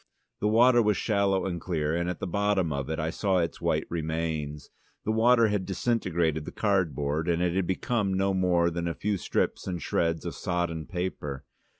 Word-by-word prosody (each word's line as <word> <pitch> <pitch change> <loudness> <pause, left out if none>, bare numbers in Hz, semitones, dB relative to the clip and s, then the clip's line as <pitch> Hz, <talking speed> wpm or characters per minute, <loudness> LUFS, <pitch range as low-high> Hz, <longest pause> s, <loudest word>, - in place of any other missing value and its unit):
The 105 - +1
water 120 +3 +5
was 105 -3 +2
shallow 100 -3 +1
and 85 -3 -3
clear, 80 -3 -1
and 85 +1 -1
at 90 - -3
the - - -3
bottom 95 -3 +1
of 70 0 -3
it 80 - -2
I 80 +1 -1
saw 95 0 +1
its 85 -2 -1
white - - +1
remains. 80 -3 -3 0.3
The 110 - +1
water 115 0 +4
had 105 -2 0
disintegrated 85 -7 0
the - - -6
cardboard, 80 -6 0
and 85 -1 +2
it 90 -1 +1
had 95 -1 0
become 100 0 0
no 95 +1 +1
more 90 -2 +2
than 85 0 -2
a 85 - -2
few 105 0 -1
strips - - -1
and 90 -2 -2
shreds 85 -1 -1
of - - -3
sodden 85 -3 -2
paper. 75 -7 -4
90 Hz, 195 wpm, -28 LUFS, 80-100 Hz, 0.3 s, water